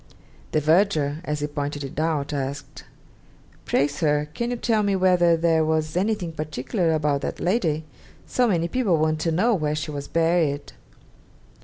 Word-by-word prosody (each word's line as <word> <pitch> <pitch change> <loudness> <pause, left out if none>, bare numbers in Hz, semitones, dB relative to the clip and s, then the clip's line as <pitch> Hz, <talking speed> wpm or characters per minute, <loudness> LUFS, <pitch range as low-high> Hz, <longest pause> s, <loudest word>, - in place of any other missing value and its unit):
The 155 - +2
verger, 155 -2 +2
as 150 0 -2
he - - 0
pointed 145 -1 -4
it 135 +2 -6
out, 155 -2 -1
asked, 140 0 -5 0.8
'Pray, 140 - +2
sir, 150 0 0
can 235 0 -2
you 245 - -1
tell 225 -2 +1
me 200 -1 +1
whether 180 -3 +4
there 165 -1 +2
was 155 0 0
anything 190 -2 0
particular 155 - -2
about 150 -2 0
that - - -4
lady; 165 -6 0 0.4
so 250 -1 +1
many 170 -5 +1
people 200 -5 +1
want 155 0 +1
to 165 +1 0
know 210 +9 +2
where 150 -6 0
she 150 0 -4
was 140 -1 -5
buried?' 165 -4 +1
160 Hz, 165 wpm, -24 LUFS, 150-180 Hz, 0.8 s, whether